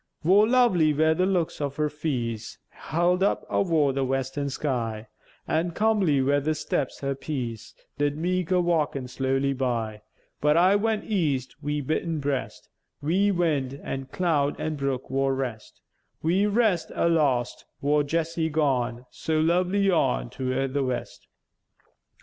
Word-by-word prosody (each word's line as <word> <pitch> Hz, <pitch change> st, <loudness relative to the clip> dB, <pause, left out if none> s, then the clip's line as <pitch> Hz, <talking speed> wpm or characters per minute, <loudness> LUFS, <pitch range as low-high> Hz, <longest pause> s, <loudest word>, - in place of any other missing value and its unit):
Vor 200 Hz, +6 st, +5 dB
lovely 220 Hz, -11 st, +4 dB
wer 160 Hz, +2 st, +4 dB
the 180 Hz, +3 st, +1 dB
looks 180 Hz, -4 st, 0 dB
her 145 Hz, -1 st, -1 dB
feäce 140 Hz, -6 st, -3 dB
Held 175 Hz, +4 st, 0 dB
up 200 Hz, -, +1 dB
avore 160 Hz, -7 st, +2 dB
the 135 Hz, 0 st, 0 dB
western 135 Hz, +2 st, -2 dB
sky: 115 Hz, -6 st, -2 dB, 0.4 s
An' 165 Hz, +2 st, 0 dB
comely 195 Hz, -11 st, +2 dB
wer 140 Hz, +2 st, +3 dB
the 155 Hz, +2 st, -1 dB
steps 145 Hz, -2 st, -2 dB
her 140 Hz, 0 st, -1 dB
peäce 120 Hz, -6 st, -5 dB, 0.2 s
Did 145 Hz, 0 st, +1 dB
meäke 180 Hz, +1 st, -1 dB
a 185 Hz, -, +2 dB
walkèn 150 Hz, -6 st, 0 dB
slowly 135 Hz, +1 st, 0 dB
by: 115 Hz, -5 st, -2 dB, 0.4 s
But 150 Hz, +2 st, +3 dB
I 185 Hz, +3 st, +5 dB
went 220 Hz, +1 st, 0 dB
east, 150 Hz, -, -1 dB
wi' 150 Hz, 0 st, -2 dB
beatèn 160 Hz, +3 st, -1 dB
breast, 140 Hz, -2 st, -3 dB, 0.4 s
Wi' 190 Hz, +7 st, +2 dB
wind, 150 Hz, -8 st, 0 dB
an' 135 Hz, -1 st, -4 dB
cloud, 145 Hz, -2 st, 0 dB
an' 155 Hz, -1 st, -2 dB
brook, 135 Hz, -2 st, -2 dB
vor 135 Hz, 0 st, 0 dB
rest, 125 Hz, -5 st, -5 dB, 0.4 s
Wi' 180 Hz, +6 st, +2 dB
rest 210 Hz, -4 st, +1 dB
a -, -, +2 dB
lost, 140 Hz, -8 st, +1 dB
vor 145 Hz, +1 st, +2 dB
Jessie 165 Hz, +2 st, -1 dB
gone 130 Hz, -5 st, 0 dB
So 160 Hz, -1 st, -1 dB
lovely 180 Hz, +4 st, +2 dB
on, -, -, +1 dB
toward 130 Hz, +1 st, -2 dB
the 140 Hz, -1 st, +1 dB
west. 130 Hz, -1 st, -4 dB
150 Hz, 145 wpm, -26 LUFS, 135-170 Hz, 0.4 s, Vor